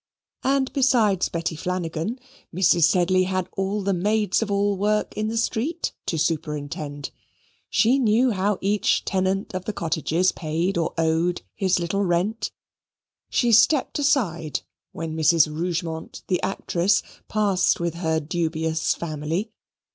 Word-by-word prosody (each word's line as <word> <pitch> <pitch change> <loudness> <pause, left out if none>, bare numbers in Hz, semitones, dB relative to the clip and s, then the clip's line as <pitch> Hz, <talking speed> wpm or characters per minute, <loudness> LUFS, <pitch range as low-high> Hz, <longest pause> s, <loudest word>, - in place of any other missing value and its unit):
And 270 0 +1
besides 235 -8 +3
Betty 165 -1 -2
Flanagan, 175 +5 -3 0.3
Mrs. 175 -2 +4
Sedley 185 +1 +3
had 185 -1 -1
all 195 +2 -1
the 195 0 +1
maids 210 +3 +1
of 225 - -2
all 200 0 +1
work 210 +2 0
in 215 0 -1
the 225 +1 -2
street 250 +9 -1 0.2
to 165 - -1
superintend. 150 -2 -3 0.6
She 250 +5 +3
knew 240 +1 +3
how 200 0 0
each 205 +1 +1
tenant 190 +1 -1
of 185 0 -4
the 215 - -3
cottages 165 +1 0
paid 165 +4 -2
or 170 -1 -1
owed 165 +2 +1
his 190 -2 +1
little 175 +4 -1
rent. 185 +5 0 0.8
She 240 -1 +2
stepped 255 +6 +4
aside 170 - 0 0.3
when 160 -1 -5
Mrs. 160 0 +4
Rougemont 165 -1 -4
the 180 - 0
actress 190 0 +1 0.2
passed 205 -4 +2
with 170 -1 -1
her 160 -2 0
dubious 160 0 -1
family. 165 +6 -3
185 Hz, 135 wpm, -24 LUFS, 165-210 Hz, 0.8 s, Mrs